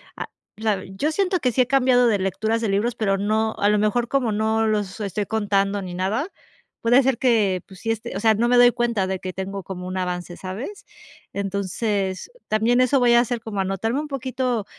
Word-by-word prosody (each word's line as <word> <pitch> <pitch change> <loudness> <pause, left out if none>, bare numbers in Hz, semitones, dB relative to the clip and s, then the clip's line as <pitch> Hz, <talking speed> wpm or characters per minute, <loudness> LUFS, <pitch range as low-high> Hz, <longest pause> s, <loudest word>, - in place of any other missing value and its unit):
a - - -5 0.3
la 210 -3 -1
yo 195 +12 -2
siento 375 +1 +1
que 250 - +1
sí 255 - +2
he 250 - +2
cambiado 255 -2 +4
de 210 -3 +3
lecturas 215 +4 -1
de 220 - -1
libros, 220 +4 0
pero 195 -4 0
no 220 +2 0
a 205 - +3
lo 210 - +3
mejor, 215 +3 +1
como 250 -5 0
no 220 +1 +1
los 210 -2 -1
estoy 205 0 -3
contando 200 -2 0
ni 180 -1 -6
nada, 210 - -1 0.5
puede 245 +4 +5
ser 255 -2 +1
que, 210 -8 +2
pues 190 -2 -14
si, 225 - -1
este 225 -4 -4
o - - -3
sea, 220 0 +4
no 235 +3 +1
me 245 0 +4
doy 245 0 +7
cuenta 235 -5 0
de 190 -1 -3
que 185 -1 -6
tengo 195 +1 -5
como 180 -1 -7
un 185 +1 -4
avance, 180 -1 -4
¿sabes? 225 - -7 0.4
Entonces 200 - -2 0.2
también 230 +4 +2
eso 255 +2 +3
voy 240 -1 +4
a 235 - +7
hacer 240 0 0
como 220 -3 -5
anotarme 195 +7 -1
un 305 - -4
poquito 255 -4 -2
220 Hz, 215 wpm, -23 LUFS, 195-245 Hz, 0.5 s, doy